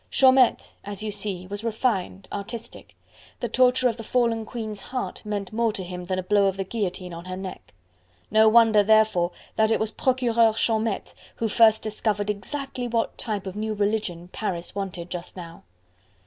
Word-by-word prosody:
Chaumette, 260 Hz, -2 st, +4 dB
as 205 Hz, +1 st, -6 dB
you 215 Hz, -, -2 dB
see, 195 Hz, -3 st, -2 dB
was 205 Hz, +3 st, -6 dB
refined, 215 Hz, -5 st, -1 dB
artistic; 230 Hz, +4 st, -7 dB, 0.4 s
the -, -, -2 dB
torture 255 Hz, 0 st, +4 dB
of 230 Hz, -2 st, -1 dB
the 225 Hz, -, -7 dB
fallen 230 Hz, -1 st, +1 dB
Queen's 215 Hz, -3 st, -5 dB
heart 255 Hz, -1 st, -5 dB
meant 205 Hz, -2 st, -4 dB
more 230 Hz, 0 st, +2 dB
to 195 Hz, -, -4 dB
him 180 Hz, 0 st, -6 dB
than 185 Hz, +1 st, -2 dB
a 185 Hz, -, -2 dB
blow 200 Hz, +1 st, +3 dB
of 195 Hz, 0 st, -1 dB
the 195 Hz, -, -1 dB
guillotine 185 Hz, -3 st, -4 dB
on 170 Hz, +1 st, -8 dB
her 185 Hz, 0 st, -5 dB
neck. 190 Hz, -1 st, -8 dB, 0.6 s
No 220 Hz, +1 st, +6 dB
wonder, 225 Hz, -2 st, +6 dB
therefore, 215 Hz, -4 st, +4 dB, 0.3 s
that 220 Hz, 0 st, +4 dB
it 225 Hz, -, +2 dB
was 220 Hz, 0 st, -1 dB
Procureur 235 Hz, -4 st, +2 dB
Chaumette 220 Hz, -2 st, 0 dB, 0.2 s
who 230 Hz, -, -1 dB
first 220 Hz, 0 st, +5 dB
discovered 210 Hz, -1 st, -1 dB
exactly 250 Hz, +5 st, -5 dB
what 230 Hz, -1 st, -1 dB
type 210 Hz, -4 st, -3 dB
of 190 Hz, 0 st, -6 dB
new 215 Hz, +1 st, -2 dB
religion 200 Hz, -4 st, -1 dB
Paris 180 Hz, -5 st, -4 dB
wanted 185 Hz, -3 st, -5 dB
just 175 Hz, +1 st, -6 dB
now. 170 Hz, -2 st, -9 dB
215 Hz, 175 wpm, -25 LUFS, 190-230 Hz, 0.6 s, No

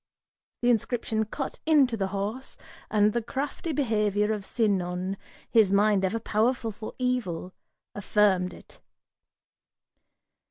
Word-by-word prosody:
Th' -, -, +1 dB
inscription 225 Hz, -1 st, +1 dB
cut 270 Hz, +6 st, -5 dB
into 280 Hz, -7 st, +4 dB
the 195 Hz, -3 st, -1 dB
horse, 205 Hz, +7 st, -4 dB, 0.3 s
and 210 Hz, 0 st, +3 dB
the 235 Hz, -, 0 dB
crafty 280 Hz, +7 st, -4 dB
behavior 210 Hz, -6 st, +1 dB
Of 205 Hz, -2 st, -5 dB
Sinon, 185 Hz, -4 st, 0 dB, 0.3 s
his 220 Hz, -5 st, +4 dB
mind 200 Hz, -1 st, +3 dB
ever 195 Hz, +4 st, 0 dB
powerful 225 Hz, +2 st, 0 dB
for 215 Hz, +1 st, -8 dB
evil, 225 Hz, -9 st, -2 dB, 0.4 s
affirmed 195 Hz, -3 st, +2 dB
it. -, -, -15 dB
215 Hz, 115 wpm, -27 LUFS, 200-240 Hz, 0.4 s, into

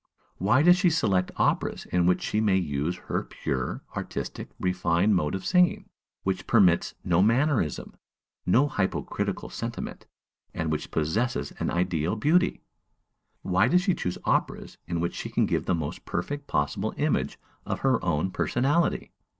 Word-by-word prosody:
why 120 Hz, +9 st, +3 dB
does 175 Hz, +2 st, +7 dB
she 185 Hz, -1 st, +4 dB
select 100 Hz, -, +1 dB
operas -, -, 0 dB
in 90 Hz, -1 st, +2 dB
which 90 Hz, -, +2 dB
she 105 Hz, -, 0 dB
may 100 Hz, -3 st, +3 dB
use 80 Hz, 0 st, -1 dB
her -, -, -3 dB
pure, 65 Hz, -2 st, -4 dB
artistic, -, -, -5 dB
refined 90 Hz, +2 st, +2 dB
mode 75 Hz, -1 st, 0 dB
of 95 Hz, -, -6 dB
singing, 180 Hz, -1 st, +3 dB, 0.4 s
which 95 Hz, -1 st, -2 dB
permits 95 Hz, -7 st, +4 dB
no 85 Hz, 0 st, +3 dB
mannerism, 115 Hz, -, +1 dB, 0.5 s
no 130 Hz, +11 st, +4 dB
hypocritical 105 Hz, -10 st, -2 dB
sentiment, -, -, -6 dB, 0.5 s
and 80 Hz, -1 st, -1 dB
which 75 Hz, -1 st, -3 dB
possesses 105 Hz, +12 st, -1 dB
an -, -, -1 dB
ideal 85 Hz, 0 st, 0 dB
beauty? 160 Hz, +11 st, +2 dB, 0.8 s
why 95 Hz, 0 st, +3 dB
does 180 Hz, +1 st, +3 dB
she 190 Hz, -2 st, +2 dB
choose 90 Hz, -, -3 dB
operas -, -, -1 dB
in 85 Hz, -1 st, -2 dB
which 85 Hz, +1 st, -1 dB
she -, -, -5 dB
can -, -, +2 dB
give -, -, -1 dB
the 90 Hz, -, +2 dB
most 80 Hz, -4 st, -5 dB
perfect 145 Hz, +11 st, -4 dB
possible 75 Hz, 0 st, -1 dB
image -, -, 0 dB, 0.3 s
of -, -, -4 dB
her 130 Hz, -3 st, +2 dB
own 85 Hz, +1 st, 0 dB
personality? 145 Hz, -, 0 dB
95 Hz, 150 wpm, -27 LUFS, 85-130 Hz, 0.8 s, does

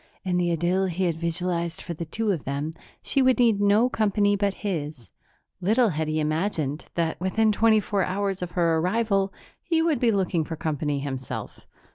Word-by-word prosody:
In 180 Hz, -2 st, 0 dB
the 175 Hz, -1 st, +1 dB
idyll 175 Hz, +3 st, +1 dB
he 185 Hz, +1 st, -2 dB
had 170 Hz, -3 st, 0 dB
visualized 170 Hz, 0 st, -2 dB
for 175 Hz, -, -5 dB
the 170 Hz, +1 st, -5 dB
two 215 Hz, +6 st, -1 dB
of 170 Hz, -7 st, -2 dB
them, 140 Hz, +4 st, -3 dB, 0.3 s
she 275 Hz, -, +1 dB
would 260 Hz, -1 st, +4 dB
need 230 Hz, -5 st, +3 dB
no 205 Hz, +4 st, +4 dB
company 205 Hz, -3 st, +2 dB
but 200 Hz, -1 st, 0 dB
his. 150 Hz, -, -4 dB, 0.5 s
Little 220 Hz, +5 st, +3 dB
had 160 Hz, -2 st, -2 dB
he 155 Hz, 0 st, 0 dB
imagined 155 Hz, -1 st, -1 dB
that, 165 Hz, 0 st, -1 dB
within 215 Hz, +4 st, +2 dB
twenty 220 Hz, +1 st, +4 dB
four 200 Hz, -2 st, 0 dB
hours 195 Hz, 0 st, -2 dB
of 180 Hz, -1 st, -5 dB
her 170 Hz, -2 st, +2 dB
arrival, 195 Hz, +1 st, +1 dB, 0.3 s
he 330 Hz, -2 st, 0 dB
would 320 Hz, -6 st, +1 dB
be 240 Hz, -, +3 dB
looking 185 Hz, -5 st, +1 dB
for 165 Hz, -, -5 dB
company 150 Hz, -2 st, -2 dB
himself. 130 Hz, -2 st, -6 dB
180 Hz, 185 wpm, -25 LUFS, 160-205 Hz, 0.5 s, would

